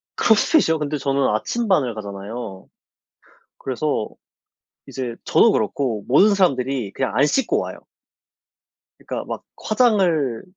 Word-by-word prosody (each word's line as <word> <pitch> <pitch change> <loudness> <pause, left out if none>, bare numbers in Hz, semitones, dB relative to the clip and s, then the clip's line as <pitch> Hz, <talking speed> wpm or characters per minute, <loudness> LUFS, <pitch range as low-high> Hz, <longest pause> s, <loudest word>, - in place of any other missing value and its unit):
크로스핏이요? 215 - +3
근데 150 0 -2
저는 140 -1 0
아침반을 140 - 0
가잖아요. 100 0 -7 0.9
그래서 130 -3 -2 0.8
이제 125 -3 -5
저도 - - +5
그렇고 115 -7 -1
모든 195 +11 +5
사람들이 135 - 0
그냥 130 -6 -2
안 140 - +4
씻고 245 - +1
와요. - - -6 1.2
그러니까 - - -4
막 - - -6 0.2
화장을, 180 - +2
135 Hz, 280 characters per minute, -21 LUFS, 115-175 Hz, 1.2 s, 저도